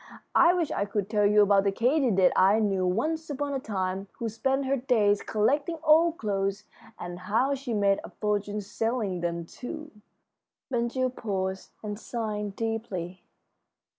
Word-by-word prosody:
I 345 +1 +6
wish 340 -4 0
I 200 - 0
could 205 0 -3
tell 210 -2 +3
you 210 0 +5
about 200 -1 +4
the 200 - +2
katydid 235 -5 +3
I 195 +3 +5
knew 195 -4 +1
once 315 - -1
upon 285 0 -2
a 270 - -1
time 195 -3 -3
who 230 - -4
spent 265 +5 0
her 270 +1 +1
days 225 -6 +2
collecting 285 +10 0
old 325 +2 +5
clothes, 200 -1 -1 0.3
and 175 0 -7
how 225 +9 +1
she 265 -4 -3
made 200 -1 +3
a - - -8
fortune 210 0 -2
selling 210 -2 -2
them 170 -1 -2
to 310 - -8 0.4
" - - -61
Ben 235 -1 +1
Gile 255 +1 -1
paused 190 -5 -3
and 210 0 -5
sighed 210 -4 -4
deeply. 205 -6 -4
210 Hz, 165 wpm, -27 LUFS, 195-255 Hz, 0.4 s, I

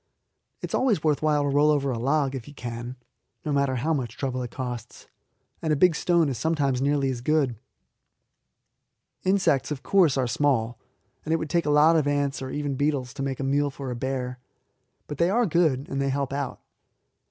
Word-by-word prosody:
It - - -4
is - - -8
always 225 - +2
worth 150 -2 +2
while 150 -1 +2
to 145 - 0
roll 145 +2 +4
a 150 - +4
log 135 +2 0
over, - - -6
if 125 -4 -7
you 145 - -12
can, 120 0 -6 0.5
no 150 - -1
matter 140 -2 +1
how 155 +7 0
much 120 -5 -3
trouble 130 -2 -2
it 125 - -4
costs; 125 -2 -6 0.6
and 160 - -1
a - - +4
big 175 +4 +4
stone 170 0 +2
is 130 -5 -3
sometimes 145 -5 0
nearly 140 -1 +1
as 120 -2 -5
good. 140 -3 +1 1.7
Insects, 190 -8 +2
of 145 -3 -5
course, 175 -9 +3
are 130 - +2
small, 120 -3 0 0.4
and 160 - -1
it - - +2
would 160 -1 -5
take 170 -2 +1
a - - +2
lot 150 +3 +5
of 155 -3 +2
ants, 145 -1 0
or 130 - -5
even 145 0 -2
beetles, 135 -2 -1
to 140 - -6
make 135 -1 -2
a - - -2
meal 145 +2 +1
for 135 -1 -6
a - - -3
bear; 125 0 -3 0.7
but 150 - -7
they 170 +1 +3
are 235 +5 +2
good, 155 -7 +1
and 135 0 -2
they 140 - 0
help 140 0 -2
out. 140 -2 -3
140 Hz, 210 wpm, -25 LUFS, 130-150 Hz, 1.7 s, lot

